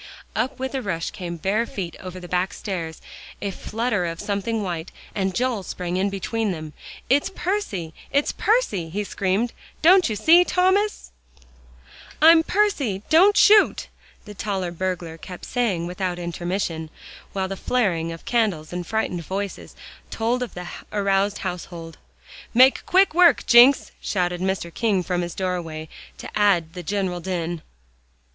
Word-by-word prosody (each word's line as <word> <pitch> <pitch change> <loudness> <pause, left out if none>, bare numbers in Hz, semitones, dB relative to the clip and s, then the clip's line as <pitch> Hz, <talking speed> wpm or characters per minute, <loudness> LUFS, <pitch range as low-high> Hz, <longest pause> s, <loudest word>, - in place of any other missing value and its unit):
Up 260 0 -1
with 265 +1 -4
a 265 - -1
rush 170 -7 -3
came 170 -2 -6
bare 210 +7 0
feet 175 -5 -5
over 185 0 -8
the 180 - -9
back 180 +1 -1
stairs; 170 -6 -5 0.4
a 200 - -3
flutter 215 -2 -2
of 165 0 -5
something 210 +2 -2
white, 175 -3 -4 0.2
and 190 -2 -1
Joel 245 -4 0
sprang 180 -1 -4
in 190 +2 +1
between 205 +2 -2
them. 155 -3 -6 0.3
"It's 285 +7 +2
Percy 345 - -3 0.2
it's 285 +1 +2
Percy!" 305 - 0
he 205 +5 -2
screamed, 200 +4 -1 0.3
"don't 360 -2 +6
you 215 - -2
see, 335 - +6
Thomas?" 375 +4 +1 1.1
"I'm 325 +2 +8
Percy 310 - 0
don't 385 +6 +6
shoot!" 420 0 +5 0.4
the 210 - -9
taller 195 -3 -3
burglar 175 -2 -4
kept 180 0 -9
saying 210 -9 0
without 180 0 -3
intermission, 175 -1 -3 0.4
while 190 -1 -1
the 195 - -4
flaring 185 -8 0
of 165 - -9
candles 200 -10 0
and 180 -1 -4
frightened 200 -6 -1
voices, 195 +3 -5 0.3
told 235 +2 -1
of 250 - -5
the 180 0 -6 0.2
aroused 200 0 +1
household. 170 -2 -6 0.6
"Make 260 +2 +5
quick 380 0 +4
work, 340 -5 +5
Jencks!" 245 +4 +6
shouted 180 -2 -1
Mr. 185 -3 -2
King 205 -6 +1
from 180 0 -1
his 175 -1 -5
doorway, 165 -4 -3 0.3
to - - -8
add 195 -6 +3
to - - -27
the 180 - -6
general 190 -1 -2
din. 175 -2 -3
195 Hz, 150 wpm, -23 LUFS, 175-240 Hz, 1.1 s, I'm